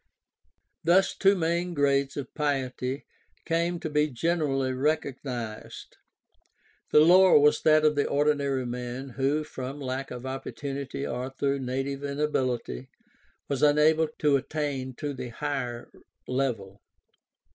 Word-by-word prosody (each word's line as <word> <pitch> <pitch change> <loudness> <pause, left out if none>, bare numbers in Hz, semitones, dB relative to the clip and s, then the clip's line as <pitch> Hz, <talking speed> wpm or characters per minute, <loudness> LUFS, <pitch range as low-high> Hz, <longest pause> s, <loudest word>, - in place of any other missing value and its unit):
Thus 180 +4 +4
two 195 0 +4
main 170 0 -1
grades 140 -1 +1
of 140 -3 -6
piety 135 -2 -2 0.4
came 170 +1 0
to - - -3
be 150 0 +3
generally 140 -2 0
recog 140 0 0
nized. 120 -5 -6 1.0
The 150 - +6
lower 180 +3 +7
was 150 0 +4
that 155 0 +4
of 155 - +5
the 145 - +1
ordinary 140 -2 +1
man 125 +2 -5
who, 135 +4 0
from 135 -1 -7
lack 135 0 -4
of 125 +1 -7
opportunity 135 +1 -5
or 125 +1 -3
through 140 +1 -1
native 135 +2 -3
inability, 130 - -2 0.6
was 140 -2 -2
unable 150 +2 +4
to 145 -2 +3
attain 135 -2 -3
to 145 +1 -4
the 125 -2 -6
higher 125 -2 -4 0.4
level. 115 -7 -2
140 Hz, 125 wpm, -27 LUFS, 130-150 Hz, 1.0 s, lower